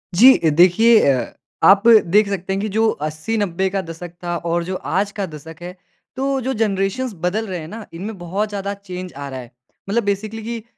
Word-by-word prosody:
जी 235 +8 +7
अ, 160 - +1
देखिए 185 +8 +5
अ, 130 -2 -2 0.3
आप 200 +3 +6 0.3
देख 210 0 +5
सकते 190 -1 -3
हैं 195 - -2
कि 215 - -2
जो 220 +1 +3 0.2
80-90 190 +3 -2
का 195 - +1
दशक 165 +1 -8
था 175 0 -2
और 170 +1 0
जो 185 +2 -4 0.2
आज 200 +2 +1
का 200 - 0
दशक 160 -1 -11
है, 175 +1 -7 0.4
तो 270 0 -1
जो 265 - 0
जनरेशन्स 205 +3 -1
बदल 215 +5 0
रहे 185 -3 -4
हैं 155 - -8
ना, 220 +4 -8
इनमें 200 +5 -6
बहुत 190 +5 -3
ज़्यादा 200 -1 -4
चेंज 185 -2 -8
आ 140 +1 -7
रहा 130 -1 -6
है 120 -1 -11 0.4
मतलब 230 +3 +1
बेसिकली 215 +3 -5
कि 230 -2 -5
195 Hz, 205 wpm, -20 LUFS, 175-215 Hz, 0.4 s, जी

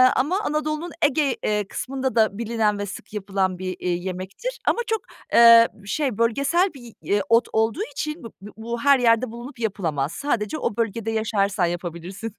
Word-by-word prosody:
ama 350 +9 +1
Anadolu'nun 305 +2 -2
Ege, 290 -2 +2
eee, 210 -2 0
kısmında 265 -1 -3
da 215 -3 +3
bilinen 220 -2 0
ve 205 - -2
sık 200 - -9
yapılan 195 -2 -1
bir, 185 0 -4
iii, 175 0 -2
yemektir 190 - -5
ama - - +3
çok, 445 -1 0 0.3
eee, 230 0 +9 0.2
şey, 260 +1 -1
bölgesel 280 - +2
bir, 240 -4 -12 0.2
ııı, 205 - +3
ot 230 0 +4
olduğu 225 - +1
için 305 - -4
b - - -6
b 205 +1 -10
bu 235 +1 -4
her 280 -2 +5
yerde 230 0 +3
bulunup 240 +2 -9
yapılamaz. 165 -10 -1
Sadece 240 - -2
o 205 - -2
bölgede 225 0 -1
yaşarsan 205 -4 +1
yapabilirsin. 175 +5 -5
225 Hz, 170 wpm, -23 LUFS, 200-270 Hz, 0.3 s, eee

